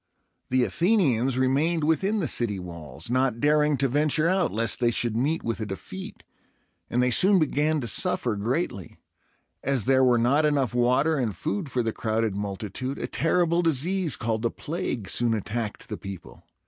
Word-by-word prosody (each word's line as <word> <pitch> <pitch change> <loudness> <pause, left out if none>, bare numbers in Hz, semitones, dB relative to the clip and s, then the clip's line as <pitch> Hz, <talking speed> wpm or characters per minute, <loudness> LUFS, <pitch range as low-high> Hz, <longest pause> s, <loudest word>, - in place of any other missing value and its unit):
The 130 0 +2
Athenians 135 - +2
remained 145 +6 +1
within 190 +7 +1
the 180 -7 0
city 110 -5 0
walls, 85 +1 -8
not 130 -2 +1
daring 150 0 +3
to 135 - +2
venture 150 +4 +1
out 185 +1 +1
lest 115 0 -1
they 120 -2 +3
should 120 -1 -1
meet 145 +8 0
with 115 0 -3
a 110 - -3
defeat, 95 -1 -8 0.7
and 125 +1 +1
they 125 - +2
soon 190 +10 +5
began 155 -1 +1
to 120 - -4
suffer 115 +1 +1
greatly. 105 - -3 0.7
As 135 -5 0
there 130 0 +4
were 125 -2 +4
not 130 +6 +3
enough 140 -6 +1
water 130 +6 +2
and 110 -6 -1
food 160 0 -3
for 125 -2 -1
the 115 -1 -2
crowded 110 -2 -1
multitude, 105 +6 -4
a - - -3
terrible 170 +1 +1
disease 165 +1 +1
called 110 -1 -2
the 115 - +1
plague 130 - -4
soon 115 +4 +1
attacked 110 +1 -4
the 105 - -5
people. 95 -2 -10
130 Hz, 175 wpm, -25 LUFS, 115-155 Hz, 0.7 s, soon